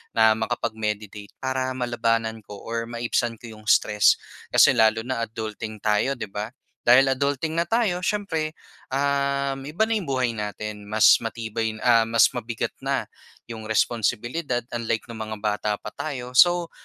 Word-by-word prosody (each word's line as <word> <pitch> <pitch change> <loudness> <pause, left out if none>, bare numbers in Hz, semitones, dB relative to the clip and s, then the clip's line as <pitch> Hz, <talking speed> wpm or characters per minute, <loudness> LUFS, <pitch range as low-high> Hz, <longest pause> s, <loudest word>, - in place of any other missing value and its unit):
na 110 -1 +6
makapag-meditate 110 -3 -3
para 130 0 -1
malabanan 115 -2 0
ko 105 - -9
or 115 0 -3
maibsan 120 0 -1
ko 115 +1 -11
'yong 110 -1 -14
stress. 105 +1 +4 0.3
Kasi - - +6
lalo 110 0 +4
na 130 0 -3
adulting 110 -1 -6
tayo 105 +6 +2
'di 120 - -6
ba? 105 +1 -3 0.4
Dahil 130 +3 +6
adulting 140 +4 -1
na 170 - +2
tayo 220 -5 +1
siyempre, 165 -7 -1 0.4
um, 140 0 0
iba 165 +9 0
na - - +2
'yong 200 - -4
buhay 130 -3 +1
natin. 105 0 -5
Mas 110 +1 +6
matibay, 115 -1 -3
ah, 115 -2 +5
mas 115 0 +5
mabigat 115 0 -3
na - - -1 0.5
'yong 110 -1 -7
responsibilidad 120 +5 0
unlike 115 -2 -2
no'ng 115 -1 -8 0.2
mga - - -11
bata 105 0 -1
pa 105 - -7
tayo. 125 -5 -5
So 175 +2 +5
115 Hz, 155 wpm, -24 LUFS, 110-135 Hz, 0.5 s, na